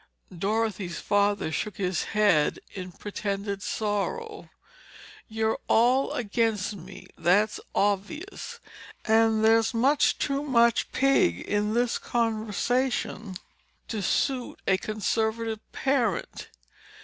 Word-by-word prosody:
Dorothy's 195 Hz, -2 st, -1 dB
father 205 Hz, -4 st, +1 dB
shook 210 Hz, +4 st, -3 dB
his 185 Hz, -2 st, -1 dB
head 205 Hz, -8 st, +3 dB, 0.2 s
in 185 Hz, -2 st, -6 dB
pretended 200 Hz, +1 st, -4 dB
sorrow. 220 Hz, -, -3 dB, 0.8 s
"You're 220 Hz, 0 st, -1 dB
all 250 Hz, +4 st, +3 dB
against 215 Hz, -3 st, 0 dB
me, 185 Hz, +1 st, -11 dB
that's 205 Hz, +6 st, +3 dB, 0.2 s
obvious. 300 Hz, -, -2 dB, 0.5 s
And 220 Hz, 0 st, +3 dB
there's 225 Hz, +1 st, +4 dB
much 280 Hz, +5 st, +3 dB
too 275 Hz, 0 st, -1 dB
much 235 Hz, -5 st, +2 dB
pig 255 Hz, -, +3 dB
in 210 Hz, +1 st, -1 dB
this 240 Hz, 0 st, +1 dB
conversation 225 Hz, -1 st, -1 dB, 0.5 s
to 220 Hz, -3 st, -2 dB
suit 255 Hz, +6 st, -1 dB
a 190 Hz, -, +3 dB
conservative 220 Hz, +1 st, -1 dB
parent." 250 Hz, -9 st, -1 dB
220 Hz, 100 wpm, -27 LUFS, 200-240 Hz, 0.8 s, there's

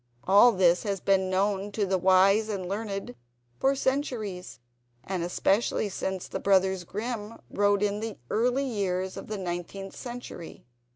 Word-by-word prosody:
All 205 Hz, +6 st, +7 dB
this 180 Hz, -4 st, +3 dB
has 200 Hz, -3 st, -2 dB
been 190 Hz, 0 st, +2 dB
known 195 Hz, +1 st, 0 dB
to 205 Hz, -1 st, 0 dB
the 190 Hz, -1 st, 0 dB
wise 190 Hz, +4 st, +4 dB
and 190 Hz, -4 st, -3 dB
learned 200 Hz, -, -4 dB, 0.5 s
for 270 Hz, +1 st, +3 dB
centuries, 245 Hz, -9 st, -2 dB, 0.5 s
and 185 Hz, -2 st, -3 dB
especially 195 Hz, +5 st, +1 dB
since 190 Hz, -1 st, -4 dB
the -, -, -4 dB
brothers 190 Hz, -1 st, +2 dB
Grimm 215 Hz, +3 st, -5 dB
wrote 205 Hz, 0 st, +2 dB
in 205 Hz, 0 st, 0 dB
the 220 Hz, -1 st, -5 dB
early 250 Hz, +5 st, +1 dB
years 190 Hz, -6 st, -2 dB
of -, -, -8 dB
the 215 Hz, -, -4 dB
Nineteenth 185 Hz, +1 st, -5 dB
Century. 245 Hz, -9 st, -8 dB
200 Hz, 150 wpm, -27 LUFS, 190-220 Hz, 0.5 s, All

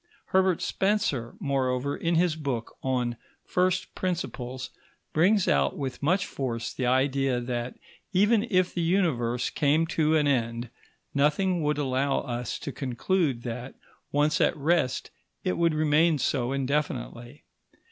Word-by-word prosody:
Herbert 190 Hz, -2 st, +3 dB
Spencer, 190 Hz, -, 0 dB
moreover, 135 Hz, -, 0 dB
in 170 Hz, 0 st, 0 dB
his 170 Hz, -1 st, +3 dB
book 135 Hz, -7 st, -4 dB
on 125 Hz, -3 st, -1 dB, 0.3 s
First 185 Hz, 0 st, 0 dB
Principles, 130 Hz, -8 st, -4 dB, 0.4 s
brings 185 Hz, +5 st, +3 dB
out 70 Hz, -1 st, +2 dB
with 135 Hz, -3 st, -4 dB
much 180 Hz, +7 st, +2 dB
force 120 Hz, -4 st, -4 dB
the 125 Hz, -, -1 dB
idea 130 Hz, 0 st, +2 dB
that, 120 Hz, 0 st, -3 dB, 0.4 s
even 210 Hz, +4 st, +3 dB
if 185 Hz, -2 st, +2 dB
the 175 Hz, -, -1 dB
Universe 145 Hz, -10 st, +1 dB
came 150 Hz, +3 st, +2 dB
to 160 Hz, -1 st, +1 dB
an 150 Hz, -2 st, +3 dB
end, 120 Hz, -3 st, 0 dB, 0.4 s
nothing 160 Hz, +6 st, +2 dB
would 150 Hz, -1 st, 0 dB
allow 135 Hz, -1 st, 0 dB
us 120 Hz, -2 st, -4 dB
to 140 Hz, -, -6 dB
conclude 135 Hz, +1 st, -1 dB
that, 125 Hz, +2 st, -6 dB, 0.4 s
once 150 Hz, +2 st, +2 dB
at -, -, +2 dB
rest, 155 Hz, -3 st, 0 dB, 0.3 s
it -, -, +1 dB
would 165 Hz, -2 st, +2 dB
remain 155 Hz, +1 st, +3 dB
so 130 Hz, -2 st, 0 dB
indefinitely. 135 Hz, -2 st, -3 dB
140 Hz, 135 wpm, -27 LUFS, 125-170 Hz, 0.4 s, Herbert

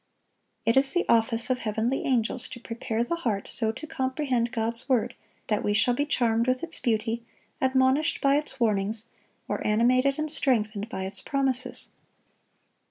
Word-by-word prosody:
It 230 Hz, -, +3 dB
is 270 Hz, 0 st, +3 dB
the 355 Hz, -, +1 dB
office 230 Hz, +1 st, +2 dB
of 250 Hz, -, +1 dB
heavenly 225 Hz, +4 st, -1 dB
angels 250 Hz, 0 st, +1 dB
to 240 Hz, -, -8 dB
prepare 230 Hz, -1 st, -2 dB
the 335 Hz, +8 st, -2 dB
heart 220 Hz, -11 st, -2 dB
so 220 Hz, -2 st, 0 dB
to 260 Hz, -, -7 dB
comprehend 260 Hz, -4 st, -1 dB
God's 230 Hz, +2 st, -2 dB
word 245 Hz, -1 st, +2 dB, 0.3 s
that 210 Hz, -1 st, 0 dB
we 205 Hz, -, +1 dB
shall 245 Hz, +3 st, +3 dB
be 290 Hz, +4 st, -1 dB
charmed 235 Hz, -3 st, +2 dB
with 255 Hz, +2 st, +1 dB
its 330 Hz, -1 st, -5 dB
beauty, 230 Hz, 0 st, 0 dB, 0.4 s
admonished 260 Hz, +3 st, +2 dB
by 275 Hz, 0 st, +3 dB
its 295 Hz, -2 st, -3 dB
warnings, 215 Hz, 0 st, 0 dB, 0.4 s
or -, -, -2 dB
animated 255 Hz, +5 st, +3 dB
and 305 Hz, -1 st, -1 dB
strengthened 220 Hz, -7 st, +1 dB
by 190 Hz, -3 st, -4 dB
its 195 Hz, 0 st, -5 dB
promises. 270 Hz, -2 st, -1 dB
240 Hz, 165 wpm, -27 LUFS, 225-265 Hz, 0.4 s, It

